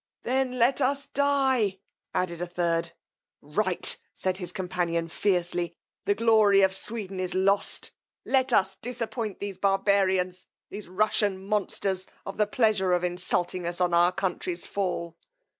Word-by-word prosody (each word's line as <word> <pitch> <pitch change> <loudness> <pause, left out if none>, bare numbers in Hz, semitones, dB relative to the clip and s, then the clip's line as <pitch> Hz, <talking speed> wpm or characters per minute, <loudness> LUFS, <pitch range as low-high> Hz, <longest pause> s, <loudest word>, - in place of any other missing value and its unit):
Then 255 0 0
let 250 +4 +3
us 280 +2 +1
dye, 265 -8 +1 0.3
added 175 -2 -2
a 175 - -2
third. 170 -1 -1 0.5
Right, 180 +5 +2 0.2
said 185 -1 -1
his 180 -2 -4
companion 175 -3 -2
feircely; 175 -1 0 0.3
the 205 - +2
glory 215 -3 +5
of 190 0 +3
Sweden 195 -3 -4
is 185 -1 -2
lost! 195 +2 +1 0.3
Let 260 -1 +2
us 195 -3 +2
disappoint 230 -2 -4
these 200 -2 -6
barbarians, 190 -2 +1 0.2
these 205 -2 -6
Russian 205 0 +1
monsters, 195 -2 -1 0.2
of 195 - -6
the 210 - +2
pleasure 205 -5 +2
of 175 0 +1
insulting 180 0 0
us 175 +1 -3
on 180 -1 +1
our 175 +1 +5
country's 180 -2 -2
fall. 175 -4 -3
190 Hz, 140 wpm, -27 LUFS, 180-215 Hz, 0.5 s, glory